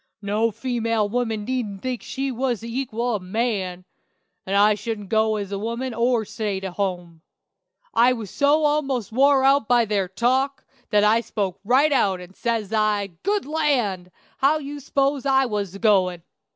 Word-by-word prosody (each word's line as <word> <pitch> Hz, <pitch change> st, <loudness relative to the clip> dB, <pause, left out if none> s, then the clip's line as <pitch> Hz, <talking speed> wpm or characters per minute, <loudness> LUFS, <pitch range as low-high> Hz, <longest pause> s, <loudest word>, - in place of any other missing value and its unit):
"No 210 Hz, +3 st, +1 dB
female 230 Hz, -1 st, -1 dB
woman 225 Hz, -2 st, -2 dB
needn't 220 Hz, -6 st, -3 dB
think 255 Hz, -2 st, -3 dB
she 270 Hz, 0 st, -3 dB
was 245 Hz, -2 st, -1 dB
the 230 Hz, +1 st, -7 dB
equal 240 Hz, -2 st, -2 dB
of 210 Hz, -, -2 dB
man; 185 Hz, -3 st, -2 dB, 0.6 s
and 195 Hz, -, -1 dB
I 205 Hz, +1 st, +5 dB
should 210 Hz, -2 st, -5 dB
go 220 Hz, 0 st, +2 dB
as 200 Hz, -2 st, -4 dB
a 200 Hz, -, -3 dB
woman 235 Hz, +4 st, -3 dB
or 235 Hz, 0 st, +1 dB
stay 205 Hz, -2 st, -3 dB
to 190 Hz, -1 st, -4 dB
home. 175 Hz, -4 st, -4 dB, 0.7 s
I 240 Hz, +2 st, +5 dB
was 220 Hz, -6 st, -7 dB
so 295 Hz, +2 st, +3 dB
almost 275 Hz, -8 st, 0 dB
wore 270 Hz, +3 st, +4 dB
out 275 Hz, -3 st, +4 dB
by 240 Hz, -1 st, +4 dB
their 200 Hz, -3 st, 0 dB
talk, 260 Hz, +8 st, 0 dB, 0.2 s
that 210 Hz, -2 st, +3 dB
I 220 Hz, +2 st, +4 dB
spoke 195 Hz, -5 st, -3 dB
right 265 Hz, +8 st, +3 dB
out, 195 Hz, -9 st, +2 dB
and, 180 Hz, +1 st, -12 dB
says 225 Hz, -3 st, -2 dB
I, 210 Hz, -2 st, +1 dB
'Good 405 Hz, +2 st, 0 dB
land! 255 Hz, -, 0 dB, 0.3 s
how 285 Hz, +3 st, +3 dB
did 300 Hz, -, -8 dB
you 290 Hz, +1 st, -6 dB
s'pose 275 Hz, 0 st, 0 dB
I 265 Hz, 0 st, +4 dB
was 205 Hz, -5 st, -3 dB
a -, -, -8 dB
goin'?' 185 Hz, -6 st, +2 dB
225 Hz, 180 wpm, -23 LUFS, 200-260 Hz, 0.7 s, I